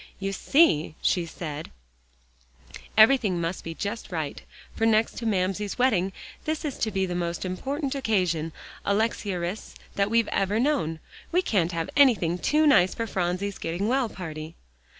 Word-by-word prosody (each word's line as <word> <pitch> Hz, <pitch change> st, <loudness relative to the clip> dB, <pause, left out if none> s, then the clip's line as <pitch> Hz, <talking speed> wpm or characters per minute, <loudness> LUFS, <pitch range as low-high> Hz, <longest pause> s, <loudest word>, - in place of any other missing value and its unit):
"You 195 Hz, 0 st, -2 dB
see," 190 Hz, -, +3 dB
she 175 Hz, -2 st, +1 dB
said, 155 Hz, -2 st, -6 dB, 1.3 s
"everything 220 Hz, -5 st, +5 dB
must 170 Hz, +2 st, -3 dB
be 165 Hz, 0 st, -6 dB
just 210 Hz, +3 st, -5 dB
right, 160 Hz, -4 st, -3 dB, 0.3 s
for 225 Hz, -, +2 dB
next 225 Hz, 0 st, +2 dB
to 230 Hz, -, -3 dB
Mamsie's 195 Hz, 0 st, -1 dB
wedding, 210 Hz, -7 st, +2 dB, 0.3 s
this 310 Hz, 0 st, -2 dB
is 285 Hz, -, -4 dB
to 220 Hz, -, +1 dB
be 190 Hz, -2 st, 0 dB
the 180 Hz, -, -4 dB
most 175 Hz, 0 st, -2 dB
important 270 Hz, -, -3 dB
occasion, 180 Hz, -, 0 dB, 0.3 s
Alexia 200 Hz, -2 st, 0 dB
Rhys, 175 Hz, +5 st, -5 dB, 0.2 s
that 200 Hz, 0 st, +1 dB
we've 230 Hz, -1 st, +3 dB
ever 200 Hz, +3 st, +1 dB
known. 245 Hz, -, 0 dB, 0.3 s
We 360 Hz, +2 st, +2 dB
can't 180 Hz, -, +1 dB
have 165 Hz, -1 st, -3 dB
anything 210 Hz, -12 st, +4 dB
too 305 Hz, +8 st, +2 dB
nice 185 Hz, -11 st, +5 dB
for 230 Hz, -, -2 dB
Phronsie's 190 Hz, 0 st, -2 dB
getting 175 Hz, +5 st, -2 dB
well 255 Hz, -1 st, +1 dB
party." 160 Hz, -4 st, -7 dB
195 Hz, 155 wpm, -26 LUFS, 175-230 Hz, 1.3 s, everything